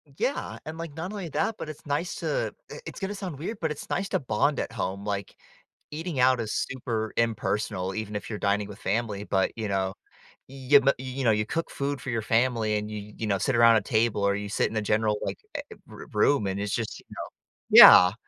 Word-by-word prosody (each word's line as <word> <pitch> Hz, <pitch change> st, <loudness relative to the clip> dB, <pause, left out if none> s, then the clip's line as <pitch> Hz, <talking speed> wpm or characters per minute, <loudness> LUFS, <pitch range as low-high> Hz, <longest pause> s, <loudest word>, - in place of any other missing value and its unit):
Yeah, 270 Hz, -, -2 dB
and, 155 Hz, +1 st, -7 dB
like, 165 Hz, -3 st, -6 dB
not 165 Hz, +5 st, -5 dB
only 200 Hz, -4 st, -5 dB
that, 220 Hz, +8 st, -1 dB
but -, -, -6 dB
it's 155 Hz, -, -10 dB
nice 145 Hz, +4 st, -2 dB
to, -, -, -2 dB, 0.2 s
eh, -, -, -7 dB
it's -, -, -8 dB
gonna 195 Hz, +1 st, -3 dB
sound 185 Hz, -7 st, -6 dB
weird, 200 Hz, +9 st, -5 dB
but 160 Hz, -2 st, -1 dB
it's -, -, -7 dB
nice 195 Hz, +2 st, -1 dB
to -, -, +1 dB
bond 130 Hz, +3 st, 0 dB
at -, -, -3 dB
home. 100 Hz, -3 st, -4 dB
Like, 100 Hz, -1 st, -4 dB, 0.6 s
eating 160 Hz, -1 st, -4 dB
out 130 Hz, 0 st, +4 dB
is 110 Hz, -1 st, -4 dB
super 115 Hz, -4 st, -3 dB
impersonal, 105 Hz, -4 st, -1 dB
even 110 Hz, -1 st, -4 dB
if -, -, -8 dB
you're 105 Hz, -, -4 dB
dining 100 Hz, 0 st, 0 dB
with 100 Hz, 0 st, -11 dB
family. 105 Hz, -1 st, -2 dB
But, 95 Hz, -2 st, +1 dB
you 110 Hz, -2 st, -2 dB
know, 95 Hz, -1 st, 0 dB, 0.5 s
you 135 Hz, +1 st, +4 dB
m 135 Hz, -, -4 dB
you 130 Hz, +1 st, -5 dB
know, 115 Hz, -, +5 dB
you 105 Hz, 0 st, +1 dB
cook 165 Hz, +9 st, -3 dB
food 140 Hz, -1 st, -3 dB
for 130 Hz, -, -7 dB
your 115 Hz, -1 st, -1 dB
family 115 Hz, -1 st, +1 dB
and 105 Hz, 0 st, -4 dB
you 105 Hz, -1 st, -7 dB
you 110 Hz, -, -3 dB
know, 100 Hz, -2 st, +1 dB
sit 130 Hz, +7 st, 0 dB
around 115 Hz, -1 st, +7 dB
a 110 Hz, -, +3 dB
table 110 Hz, 0 st, +1 dB
or 100 Hz, 0 st, +2 dB
you 105 Hz, 0 st, -4 dB
sit -, -, +1 dB
in 110 Hz, -, -4 dB
a -, -, +1 dB
general, 105 Hz, 0 st, +1 dB
like, -, -, -3 dB, 0.2 s
eh -, -, -2 dB
eh, -, -, -9 dB
r -, -, -10 dB
room 140 Hz, -8 st, +3 dB
and 95 Hz, +1 st, -2 dB
it's 105 Hz, 0 st, -2 dB
just, 115 Hz, -2 st, -3 dB
you -, -, -29 dB
know -, -, -6 dB, 0.5 s
Yeah, -, -, +12 dB
i -, -, -11 dB
115 Hz, 240 wpm, -27 LUFS, 105-145 Hz, 0.6 s, Yeah